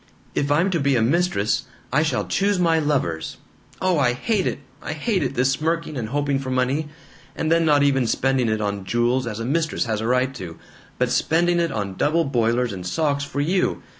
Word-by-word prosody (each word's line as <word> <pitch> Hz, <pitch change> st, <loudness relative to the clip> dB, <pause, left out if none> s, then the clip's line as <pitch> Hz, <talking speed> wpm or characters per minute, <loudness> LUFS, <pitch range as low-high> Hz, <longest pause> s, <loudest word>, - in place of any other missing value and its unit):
If 145 Hz, 0 st, 0 dB
I'm 170 Hz, +6 st, +3 dB
to 170 Hz, -, +1 dB
be 140 Hz, -2 st, +2 dB
a 120 Hz, -, +2 dB
mistress, 150 Hz, -, +1 dB, 0.3 s
I 150 Hz, -, +4 dB
shall 160 Hz, -, 0 dB
choose 200 Hz, 0 st, +1 dB
my 165 Hz, -2 st, +3 dB
lovers. 135 Hz, -, -1 dB, 0.4 s
Oh, 185 Hz, -4 st, +1 dB
I 125 Hz, -3 st, +3 dB
hate 195 Hz, -, 0 dB
it -, -, -2 dB, 0.2 s
I -, -, -4 dB
hate 185 Hz, +5 st, -1 dB
it 135 Hz, -1 st, -2 dB
this 130 Hz, +1 st, +2 dB
smirking 160 Hz, +2 st, -1 dB
and 115 Hz, -5 st, -3 dB
hoping 140 Hz, 0 st, 0 dB
for 135 Hz, -1 st, -5 dB
money 130 Hz, +4 st, 0 dB, 0.5 s
and 160 Hz, -, -1 dB
then 165 Hz, 0 st, +4 dB
not 145 Hz, -2 st, +4 dB
even 135 Hz, -3 st, +2 dB
spending 130 Hz, -1 st, +1 dB
it 110 Hz, 0 st, 0 dB
on 100 Hz, -1 st, -2 dB
jewels 120 Hz, +5 st, +1 dB
as 110 Hz, -1 st, -4 dB
a 115 Hz, -, -3 dB
mistress 160 Hz, +3 st, 0 dB
has 110 Hz, -2 st, -2 dB
a 110 Hz, -, -2 dB
right 125 Hz, +2 st, +1 dB
to, 90 Hz, -10 st, -8 dB, 0.4 s
but -, -, 0 dB
spending 175 Hz, +2 st, +2 dB
it 170 Hz, -2 st, 0 dB
on 100 Hz, -3 st, -4 dB
double 165 Hz, +3 st, +2 dB
boilers 120 Hz, -2 st, +1 dB
and 90 Hz, -2 st, -6 dB
socks 145 Hz, -, 0 dB
for 140 Hz, 0 st, -3 dB
you! 180 Hz, +5 st, 0 dB
140 Hz, 210 wpm, -22 LUFS, 120-160 Hz, 0.5 s, I